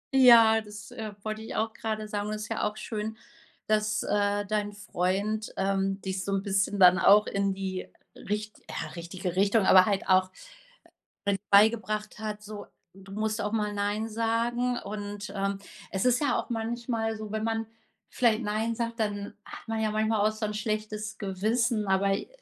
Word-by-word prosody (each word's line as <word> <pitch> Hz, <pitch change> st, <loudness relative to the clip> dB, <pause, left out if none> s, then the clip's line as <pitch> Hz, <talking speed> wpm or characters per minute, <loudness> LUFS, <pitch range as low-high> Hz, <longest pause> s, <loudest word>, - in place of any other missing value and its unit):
Ja, 230 Hz, -4 st, +8 dB
das, 215 Hz, +2 st, -11 dB
äh, 220 Hz, -4 st, -6 dB
wollte 215 Hz, 0 st, -4 dB
ich 220 Hz, -, -7 dB
auch 220 Hz, 0 st, -1 dB
grade 215 Hz, -1 st, -4 dB
sagen. 205 Hz, 0 st, -3 dB
Und 215 Hz, -, -2 dB
das 210 Hz, -, -5 dB
ist -, -, -8 dB
ja -, -, -2 dB
auch 210 Hz, -, -14 dB
schön, 220 Hz, 0 st, -4 dB, 0.5 s
dass, 215 Hz, 0 st, +1 dB
äh, 205 Hz, 0 st, +1 dB
dein 205 Hz, 0 st, -1 dB
Freund, 205 Hz, +2 st, -2 dB
ähm, 195 Hz, 0 st, 0 dB
dich 190 Hz, -1 st, -3 dB
so 200 Hz, -, -3 dB
'n 195 Hz, 0 st, 0 dB
bisschen 200 Hz, 0 st, 0 dB
dann 180 Hz, 0 st, +7 dB
auch 210 Hz, +1 st, +6 dB
in 200 Hz, -1 st, 0 dB
die 190 Hz, -1 st, -4 dB, 0.3 s
richt 210 Hz, +1 st, -4 dB
ja, -, -, -4 dB
richtige 175 Hz, +1 st, -5 dB
Richtung, 200 Hz, +2 st, +3 dB
aber 185 Hz, 0 st, +7 dB
halt 200 Hz, -2 st, 0 dB
auch 185 Hz, 0 st, +4 dB, 1.0 s
mit 200 Hz, -2 st, 0 dB
beigebracht 215 Hz, 0 st, +3 dB
hat, 210 Hz, -1 st, -5 dB
so: 210 Hz, 0 st, -8 dB, 0.3 s
Du 195 Hz, +1 st, -14 dB
musst 215 Hz, +1 st, -1 dB
auch 210 Hz, -, -2 dB
mal 210 Hz, -2 st, 0 dB
nein 205 Hz, +2 st, -1 dB
sagen. 235 Hz, +2 st, 0 dB
Und, 205 Hz, 0 st, -6 dB
ähm, 195 Hz, 0 st, -1 dB, 0.3 s
es 190 Hz, +3 st, -1 dB
ist 250 Hz, +1 st, +3 dB
ja 290 Hz, -, +2 dB
auch -, -, -12 dB
manchmal 225 Hz, -1 st, -2 dB
so, 215 Hz, -1 st, -7 dB
wenn 220 Hz, 0 st, -2 dB
man 225 Hz, 0 st, -1 dB, 0.4 s
vielleicht 235 Hz, -1 st, +2 dB
nein 220 Hz, +2 st, -1 dB
sagt, 230 Hz, 0 st, -3 dB
dann 205 Hz, -1 st, -2 dB
hat -, -, -11 dB
man 225 Hz, -1 st, -1 dB
ja 215 Hz, -1 st, 0 dB
manchmal 215 Hz, -1 st, +2 dB
auch 215 Hz, -, -2 dB
so 215 Hz, 0 st, -4 dB
'n 210 Hz, -, -4 dB
schlechtes 215 Hz, 0 st, -3 dB
Gewissen, 215 Hz, +3 st, 0 dB
aber 195 Hz, +1 st, +2 dB
i -, -, -4 dB
210 Hz, 185 wpm, -28 LUFS, 200-220 Hz, 1.0 s, Ja